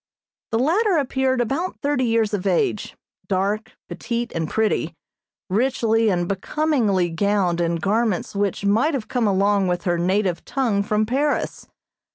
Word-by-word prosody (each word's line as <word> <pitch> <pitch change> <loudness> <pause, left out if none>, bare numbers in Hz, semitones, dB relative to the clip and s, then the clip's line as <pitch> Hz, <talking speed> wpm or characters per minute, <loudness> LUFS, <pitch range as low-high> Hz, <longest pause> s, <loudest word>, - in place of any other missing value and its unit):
The 225 - 0
latter 355 - +2
appeared 265 -2 +1
about 275 +10 -2
thirty 285 -3 +1
years 225 -2 +1
of 200 -1 -1
age, 190 +2 0 0.3
dark, 200 +3 -1
petite 235 +6 -4
and 160 -2 -2
pretty, 220 -1 0 0.5
richly 225 +1 +1
and 175 -3 0
becomingly 205 - 0
gowned 180 -1 +1
in 170 0 0
garments 205 +3 -1
which 200 0 -1
might 230 +10 +2
have 235 -6 -4
come 245 -4 0
along 200 0 +2
with 175 -1 -1
her 175 -2 0
native 185 0 0
tongue 235 -8 0
from 210 +1 0
Paris. 280 +6 -1
215 Hz, 145 wpm, -22 LUFS, 190-250 Hz, 0.5 s, latter